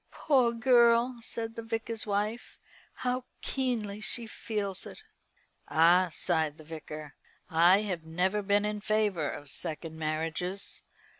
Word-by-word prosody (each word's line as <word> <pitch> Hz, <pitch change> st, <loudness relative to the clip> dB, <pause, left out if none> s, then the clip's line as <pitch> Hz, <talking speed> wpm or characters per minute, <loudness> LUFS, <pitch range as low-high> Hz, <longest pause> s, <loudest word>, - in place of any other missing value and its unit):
"Poor 260 Hz, -6 st, +2 dB
girl," 235 Hz, 0 st, +4 dB
said 225 Hz, -1 st, -5 dB
the 230 Hz, -, -6 dB
Vicar's 225 Hz, -1 st, -3 dB
wife, 210 Hz, +3 st, -2 dB, 0.4 s
"how 250 Hz, 0 st, -2 dB, 0.2 s
keenly 225 Hz, -6 st, -2 dB
she 235 Hz, +2 st, 0 dB
feels 205 Hz, -4 st, -4 dB
it!" 435 Hz, -, -11 dB, 0.6 s
"Ah!" 175 Hz, +3 st, +5 dB
sighed 160 Hz, -3 st, 0 dB
the 155 Hz, -, -12 dB
Vicar, 155 Hz, -1 st, -8 dB, 0.4 s
"I 175 Hz, +5 st, +6 dB
have 185 Hz, -6 st, -3 dB
never 180 Hz, +6 st, 0 dB
been 205 Hz, +1 st, +2 dB
in 210 Hz, 0 st, -2 dB
favour 205 Hz, -8 st, +1 dB
of 145 Hz, -, -7 dB
second 160 Hz, +2 st, -1 dB
marriages. 160 Hz, +5 st, -3 dB
205 Hz, 130 wpm, -30 LUFS, 165-230 Hz, 0.6 s, I